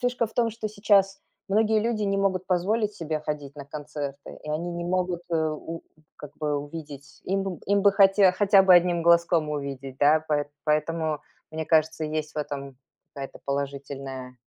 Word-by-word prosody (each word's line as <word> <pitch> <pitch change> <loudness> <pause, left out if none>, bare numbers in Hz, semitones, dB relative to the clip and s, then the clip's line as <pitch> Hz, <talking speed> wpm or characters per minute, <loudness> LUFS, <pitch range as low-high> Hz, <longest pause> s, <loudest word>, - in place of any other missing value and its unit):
фишка 245 -1 0
в 225 - -16
том, 230 -2 +2
что 215 -1 -5
сейчас 200 -2 +2 0.3
многие 215 +2 +3
люди 225 -1 -1
не 195 -1 +1
могут 190 -2 0
позволить 205 +4 0
себе 160 -4 -3
ходить 150 -2 -5
на 140 - -7
концерты. 145 -1 -7
И 150 - -5
они 165 +3 -2
не 170 0 -4
могут, 180 -1 -1
э, - - 0
у, 160 +1 -3 0.3
как 150 - -10
бы, 150 -1 0
увидеть 145 -1 -9
Им, 195 -2 -2
им 200 0 +2
бы 200 0 +6
хоте 195 -1 +5
хотя 195 +1 +5
бы 190 -1 +7
одним 175 -1 +4
глазком 170 -1 +4
увидеть, 135 -2 -5
да. 155 +2 +4
Поэ 145 -1 +1 0.2
поэтому, 155 0 0 0.3
мне 160 0 -4
кажется, 160 0 +2
есть 155 0 -3
в - - -20
этом 140 -2 -5 0.4
какая-то 135 -1 -7
положительная 135 -2 -5
165 Hz, 175 wpm, -26 LUFS, 145-195 Hz, 0.4 s, бы